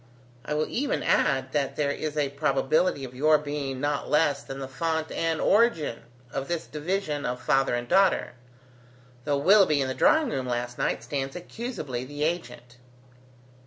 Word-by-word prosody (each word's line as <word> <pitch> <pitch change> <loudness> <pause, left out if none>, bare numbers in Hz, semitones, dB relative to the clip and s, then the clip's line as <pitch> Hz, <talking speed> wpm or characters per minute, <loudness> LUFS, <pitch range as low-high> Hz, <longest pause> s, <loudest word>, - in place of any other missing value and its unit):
I 150 - -3
will 155 +1 +1
even 280 +4 -1
add, 130 -2 +2
that 140 -2 -1
there 145 -2 0
is 150 +1 -4
a 145 -2 +1
probability 140 +2 +1
of 130 -1 -7
your 155 +4 +4
being 145 -3 -4
not 145 +1 -1
less 150 -1 +2
than 135 - -8
the 135 -1 -5
fount 160 +4 -2
and 165 -1 -1
origin 200 - +2 0.3
of 135 0 -4
this 170 -2 -2
division 155 -1 -2
of 125 0 -2
father 135 -1 +2
and 120 0 -3
daughter, 195 +7 +3 0.9
though 145 -1 +1
Willoughby 180 -1 +5
in 135 - 0
the 130 - -2
drawingroom 240 - +2
last 120 0 -3
night - - -1
stands 135 +2 -3
accusably 180 - -5
the 145 +3 -5
agent." 155 -7 -4
145 Hz, 160 wpm, -26 LUFS, 135-160 Hz, 0.9 s, Willoughby